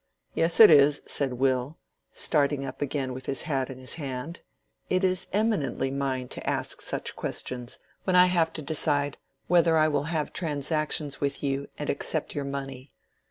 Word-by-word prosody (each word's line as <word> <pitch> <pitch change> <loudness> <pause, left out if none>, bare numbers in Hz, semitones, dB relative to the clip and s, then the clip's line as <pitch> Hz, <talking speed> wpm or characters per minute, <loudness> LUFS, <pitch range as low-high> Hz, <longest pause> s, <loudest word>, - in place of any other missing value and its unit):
"Yes, 165 +1 +1
it 220 -6 +11
is," 145 -1 +5
said 135 -3 -1
Will, 130 +3 0 0.3
starting 145 -2 +1
up 130 - -7
again 135 -2 -2
with 130 +1 -8
his 135 - -2
hat 135 -4 -1
in 130 - -7
his 130 0 -7
hand. 135 +4 -5 0.5
"It 185 +1 +1
is 185 0 +1
eminently 200 -11 0
mine 135 -2 -2
to - - -4
ask - - -2
such - - -4
questions, 125 -1 -4 0.3
when 185 - +1
I 180 0 +8
have 170 -3 +2
to 155 - -5
decide 145 -1 0 0.3
whether 170 -2 +4
I 155 0 +5
will 145 -2 0
have 160 -2 -2
transactions 150 -2 -1
with 140 0 -2
you 140 0 -1
and 150 - -4
accept 155 +2 -1
your 145 -1 -3
money. 135 -1 -6
145 Hz, 170 wpm, -27 LUFS, 135-160 Hz, 0.5 s, it